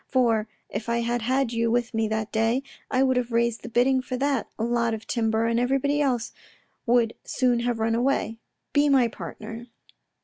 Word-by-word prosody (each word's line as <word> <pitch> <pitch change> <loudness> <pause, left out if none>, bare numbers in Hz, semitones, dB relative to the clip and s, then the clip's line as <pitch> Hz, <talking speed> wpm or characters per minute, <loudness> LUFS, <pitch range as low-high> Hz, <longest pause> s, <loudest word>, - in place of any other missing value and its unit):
For 230 -4 +2 0.2
if 215 +3 -5
I 235 0 +1
had 240 +1 -1
had 255 +1 0
you 230 0 +1
with 240 +1 0
me 225 0 +1
that 220 0 -2
day, 225 +4 +1 0.3
I 260 0 +2
would 260 -1 +2
have 250 -1 -1
raised 235 0 +1
the 235 - -8
bidding 255 +3 +3
for 255 0 -4
that 275 -2 0
lot 235 0 0
of 220 - -10
timber 225 -2 0
and 230 0 +1
everybody 275 +4 +1
else 250 -5 0 0.6
would 235 -1 +3
soon 250 -2 +1
have 240 -1 -1
run 225 0 0
away. 235 -2 0 0.3
Be 290 0 +4
my 265 -4 +5
partner. 225 +4 -8
235 Hz, 190 wpm, -25 LUFS, 225-255 Hz, 0.6 s, my